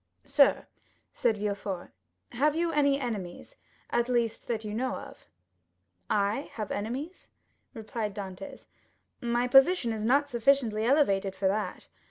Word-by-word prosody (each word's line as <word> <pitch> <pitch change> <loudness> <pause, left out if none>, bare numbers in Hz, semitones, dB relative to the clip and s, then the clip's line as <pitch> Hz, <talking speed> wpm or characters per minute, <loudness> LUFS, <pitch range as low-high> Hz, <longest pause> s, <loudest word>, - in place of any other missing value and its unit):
"Sir," - - +4 0.5
said 225 -3 +1
Villefort, 200 -3 -4 0.4
"have 290 +5 +1
you 335 0 0
any 280 -2 +3
enemies, 220 - -5 0.3
at 240 +1 +1
least, 235 -2 0
that 225 -2 -2
you 210 - -4
know." 250 +3 -3 0.9
"I 205 +7 0
have 215 -3 -5
enemies?" 260 - -5 0.5
replied 220 -2 -4
Dantès; 195 -1 -8 0.6
"my 240 +1 0
position 270 -1 +5
is 215 -1 -4
not 280 +6 +3
sufficiently 235 -3 +2
elevated 200 -8 +2
for 190 0 0
that. 210 +2 -3
230 Hz, 125 wpm, -29 LUFS, 210-270 Hz, 0.9 s, position